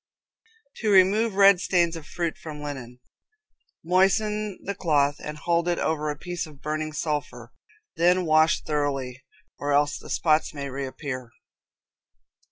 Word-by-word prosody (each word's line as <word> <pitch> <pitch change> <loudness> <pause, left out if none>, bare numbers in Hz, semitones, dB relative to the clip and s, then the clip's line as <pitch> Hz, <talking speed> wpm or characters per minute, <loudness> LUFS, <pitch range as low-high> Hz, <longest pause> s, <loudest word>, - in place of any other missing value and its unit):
To 220 - -1
Remove 200 +3 +4
Red 200 -2 +6
Stains 175 -3 +2
of 160 -2 -9
Fruit 170 -2 -3
from 150 -2 -9
Linen. 125 -4 -7 0.8
Moisten 200 +3 +1
the 200 - -3
cloth 145 -6 +1
and 150 0 -7
hold 170 +2 0
it 175 -1 +1
over 155 -1 -1
a 145 - -3
piece 175 -1 -5
of 150 -3 -15
burning 155 +1 -3
sulphur; 145 -7 -4 0.4
then 180 +2 +3
wash 155 0 +3
thoroughly, 135 -4 -2 0.4
or 145 0 -1
else 145 +1 +2
the - - -12
spots 155 -1 +1
may 140 -1 -5
reappear. 130 -2 -5
155 Hz, 140 wpm, -25 LUFS, 145-180 Hz, 0.8 s, Red